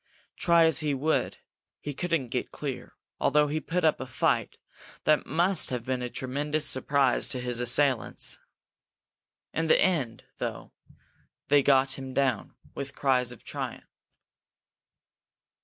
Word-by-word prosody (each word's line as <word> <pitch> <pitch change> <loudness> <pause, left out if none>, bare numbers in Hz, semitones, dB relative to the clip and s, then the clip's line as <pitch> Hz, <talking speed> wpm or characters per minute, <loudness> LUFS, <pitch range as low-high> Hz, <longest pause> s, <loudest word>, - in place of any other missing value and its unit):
Try 170 -1 +4
as 160 - +4
he 150 -3 0
would, 155 +4 0 0.4
he 145 - -5
couldn't 165 -4 -1
get - - -3
clear, - - -6 0.2
although 150 0 +3
he 155 +2 -1
put 165 +3 -1
up 155 - +3
a 130 - -5
fight 125 - 0 0.5
that 155 -1 +2
must 175 +6 +3
have 125 -2 -4
been 130 -1 -2
a 125 - -3
tremendous 145 +5 -1
surprise 135 0 +2
to 130 - -3
his 125 -1 -2
assailants. 125 +1 +1 1.1
In 165 +1 -1
the - - +5
end, 145 -12 0 0.2
though, - - -5 0.8
they 145 0 +6
got 135 -1 +3
him 130 -1 -7
down, 130 -6 0 0.2
with 140 0 -6
cries 125 -3 +1
of 125 - -13
triumph. - - -5
140 Hz, 140 wpm, -28 LUFS, 130-155 Hz, 1.1 s, they